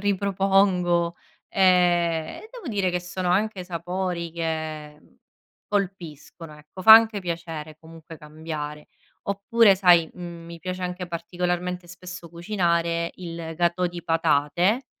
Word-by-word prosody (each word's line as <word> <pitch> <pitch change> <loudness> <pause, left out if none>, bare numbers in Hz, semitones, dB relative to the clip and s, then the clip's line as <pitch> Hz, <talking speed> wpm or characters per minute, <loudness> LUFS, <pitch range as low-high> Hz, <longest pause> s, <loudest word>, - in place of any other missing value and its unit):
ripropongo, 190 -3 +2 0.3
ehm, 175 -3 +3 0.2
e - - -13
devo 455 - -8
dire 200 -4 0
che 180 - -1
sono 180 0 -3
anche 195 -1 0
sapori 175 0 -3
che, 155 -2 -4
mhmm, - - -26 0.5
colpiscono 170 -5 -4
ecco, 170 +5 -12
fa 220 - +10
anche 225 -2 +7
piacere 165 -3 -6
comunque 165 0 -12
cambiare, 150 -1 -7 0.4
oppure 200 +1 +3
sai, 175 -4 +5
mhmm, 170 -2 -8
mi 170 -1 -10
piace 185 0 -5
anche 180 0 -4
particolarmente 180 +1 -3
spesso 180 -1 -10
cucinare 170 -2 -1
il 165 -2 -7
gâteau 175 +1 +1
di 175 -1 -9
patate, 165 - +1
175 Hz, 125 wpm, -24 LUFS, 165-185 Hz, 0.5 s, fa